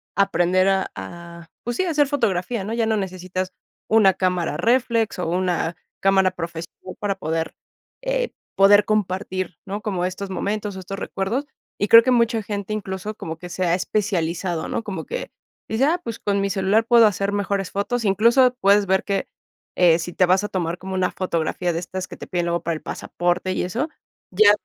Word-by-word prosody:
aprender 185 -1 +3
a 190 0 +1
a, 170 -1 -9
pues 240 0 -3
sí, - - +2
a - - -1
hacer 295 -3 +3
fotografía, 210 -6 0
¿no? 220 +3 -4
Ya 230 -1 +1
no 220 -1 +1
necesitas 185 -1 -3 0.4
una 210 -4 +6
cámara 180 -4 0
réflex 230 0 +1
o 175 - -1
una 175 -1 0 0.3
cámara 190 -1 +4
profesional 170 +1 -7
para 200 -1 -1
poder, 165 -3 -3 0.5
eh, - - -1 0.2
poder 200 +1 +6
compartir, 185 -3 -1
¿no? 205 +2 -4
Como 185 -4 -1
estos 190 +2 -4
momentos 205 +1 -3
o - - -5
estos 195 +1 -6
recuerdos. 220 +9 -2 0.3
Y 205 - +1
creo 230 +2 +9
que 255 - +2
mucha 230 -2 +2
gente 205 +1 -4
incluso 200 0 -4
como 160 -5 -6
que 180 -1 -9
se 185 +1 -2
ha 170 - +2
especializado, 180 -4 -1
¿no? - - -2
Como 200 -3 -5
que - - -5 0.4
dice: 225 +5 +1
"Ah, 335 +4 +2
pues 230 -1 -5
con 200 -1 0
mi 200 - 0
celular 195 +3 +2
puedo 235 -1 +7
hacer 200 0 -1
mejores 200 -1 -1
fotos". 230 +3 -1
Incluso 235 +6 +4
puedes 200 +1 +5
ver 190 0 +2
que, 200 -1 -1 0.5
eh, 170 -2 +5
si 175 +1 -5
te 185 - +4
vas 185 +2 +3
a - - -1
tomar 175 -3 -2
como 190 +1 -7
una 185 -1 +1
fotografía 175 -1 -1
de 165 - -1
estas 185 +1 -5
que - - -10
te - - -9
piden 175 -1 -1
luego 170 0 0
para 170 0 -1
el 155 - -7
pasaporte 175 +1 -1
y - - -1
eso, 245 - -2 0.4
ya 205 +2 +6
195 Hz, 195 wpm, -22 LUFS, 180-215 Hz, 0.5 s, creo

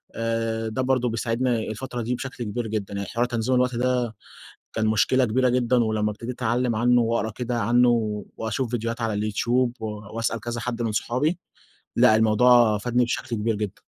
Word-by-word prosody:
آآ، 115 0 -1
ده 130 +4 -2
برضه 130 -2 +1
بيساعدني 115 +1 -1
الفترة 120 +3 -5
دي 120 +2 -1
بشكل 130 -1 -6
كبير 115 +2 -3
جدًا، 105 -2 -3
يعني 100 0 -4
حوار 120 +1 0
تنظيم 120 +1 0
الوقت 125 -1 +2
ده 125 -2 0 0.6
كان 110 - 0
مشكلة 120 +4 +3
كبيرة 125 +3 +2
جدًا، 125 0 +2
ولمّا 110 -1 0
ابتديت 115 +4 -6
أتعلّم 120 0 0
عنه 120 +2 +4
وأقرا 115 -1 0
كده 120 +1 -3
عنه، 115 -3 +2
وأشوف 115 +2 -2
فيديوهات 115 0 -3
على 115 -2 -1
اليوتيوب 120 +4 0
و - - -2 0.3
واسأل 115 0 -1
كذا 120 +1 -4
حد 120 0 -3
من 115 -2 -1
صحابي، 130 +11 0 0.6
لأ 110 - +6
الموضوع 110 0 +5
فادني 120 +3 +1
بشكل 120 0 -3
كبير 110 +1 0
جدًا. 105 -2 -5
115 Hz, 175 wpm, -24 LUFS, 110-125 Hz, 0.6 s, لأ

